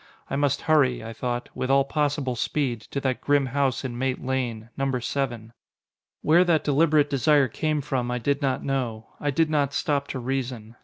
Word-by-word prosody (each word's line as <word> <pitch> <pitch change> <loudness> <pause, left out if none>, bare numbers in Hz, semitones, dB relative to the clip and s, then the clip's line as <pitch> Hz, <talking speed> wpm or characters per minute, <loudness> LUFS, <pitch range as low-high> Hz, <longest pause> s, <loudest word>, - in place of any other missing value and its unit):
I - - 0
must 145 0 +1
hurry, 140 -7 +3
I 115 +1 -6
thought, 120 +1 -3
with 130 - -3
all 135 0 +5
possible 145 -2 -1
speed, 120 -2 -1
to 140 - -2
that 130 -2 -1
grim 145 -1 +2
house 135 0 0
in 120 -2 -4
Mate 130 0 -1
Lane 120 -4 -3
number 135 -2 -1
seven. 120 -3 -3 0.7
Where 170 +4 +5
that 170 -4 +2
deliberate 150 0 +3
desire 145 0 +3
came 150 +5 -1
from 130 -4 -2
I 125 - -1
did 140 +4 0
not 135 -2 0
know. 120 -5 -2
I 145 - -1
did 155 +3 +1
not 145 -2 +1
stop 140 -2 0
to 130 - -4
reason. 125 -3 -4
135 Hz, 190 wpm, -25 LUFS, 125-145 Hz, 0.7 s, all